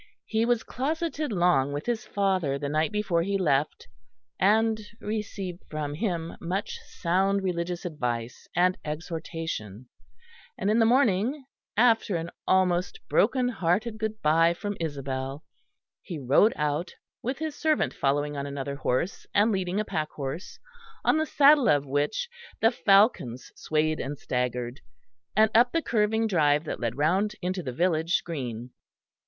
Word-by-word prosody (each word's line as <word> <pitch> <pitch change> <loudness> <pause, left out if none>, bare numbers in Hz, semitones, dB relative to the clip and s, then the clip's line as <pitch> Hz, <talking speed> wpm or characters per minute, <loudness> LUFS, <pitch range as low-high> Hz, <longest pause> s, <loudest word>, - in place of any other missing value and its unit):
He 225 +1 +1
was 240 -2 +2
closeted 305 +2 -2
long 175 -8 +3
with 145 - -4
his 240 -1 -2
father 185 -8 0
the 140 0 -3
night 155 +5 +1
before 200 -5 0
he 195 +3 0
left, 150 -5 0 0.5
and 220 +3 +3 0.2
received 200 -4 -4
from 150 -2 -3
him 170 -2 -3
much 190 +4 -3
sound 195 +3 0
religious 175 -1 -2
advice 125 -7 -4
and 180 +1 +3
exhortation; 155 - -5 0.7
and 205 - 0
in 225 - +3
the 225 - +5
morning, 255 +2 +2 0.3
after 225 -4 +4
an 165 +1 -3 0.2
almost 185 - +2
broken 260 - +3
hearted 215 +2 0
good 220 0 -3
bye 165 +2 +4
from 205 +3 -4
Isabel, 135 -2 -4 0.6
he 175 -6 -6
rode 145 - +4
out 150 +4 -2 0.3
with 260 +3 -2
his 315 -1 -3
servant 310 0 +1
following 145 +1 0
on 140 0 -3
another 140 0 -4
horse 145 +7 -1
and 210 +2 +4
leading 190 0 -1
a 215 - -1
packhorse 155 0 -4 0.5
on 310 - +4
the 315 - 0
saddle 285 -1 +5
of 145 -1 +3
which 145 - -1 0.3
the 225 - +4
falcons 195 - +3
swayed 155 0 0
and 140 +2 -4
staggered, 125 0 -3 0.5
and 215 +1 +5
up 240 +2 +5
the 330 - +2
curving 220 0 +1
drive 150 -7 +3
that 155 - -5
led 120 0 -2
round 190 +8 +1
into 185 +1 -1
the 130 - -4
village 165 +3 +1
green. 125 -7 -5
175 Hz, 145 wpm, -27 LUFS, 145-215 Hz, 0.7 s, the